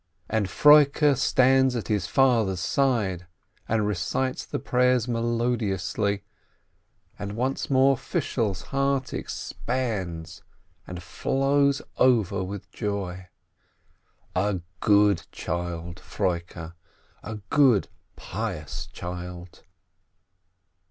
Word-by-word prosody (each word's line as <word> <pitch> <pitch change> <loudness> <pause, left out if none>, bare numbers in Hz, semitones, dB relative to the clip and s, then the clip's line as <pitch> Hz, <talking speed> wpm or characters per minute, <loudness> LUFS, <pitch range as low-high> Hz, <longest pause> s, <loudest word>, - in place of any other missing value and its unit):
And 110 -3 0
Froike 150 - +6
stands 130 0 +3
at 115 - -3
his 105 -4 0
father's 115 -8 +2
side, 95 -5 0 0.4
and 110 -2 +1
recites 105 +7 -1
the - - -4
prayers 125 -1 +2
melodiously, 110 -5 -1 1.0
and 100 0 -4
once 130 +4 -2
more 135 0 +4
Fishel's 110 -5 -2
heart 135 -1 0
expands 95 -10 -4 0.5
and 90 -1 -7
flows 140 +7 +1
over 115 -8 +3
with 100 +1 -7
joy 95 -4 -4 0.6
— - - -39
a 95 0 0 0.2
good 100 -4 +3
child, 85 +1 -4
Froike, 85 -2 -3 0.5
a 110 - -6 0.2
good, 130 -9 +4 0.3
pious - - -5
child 90 0 -8
105 Hz, 90 wpm, -26 LUFS, 90-130 Hz, 1.0 s, Froike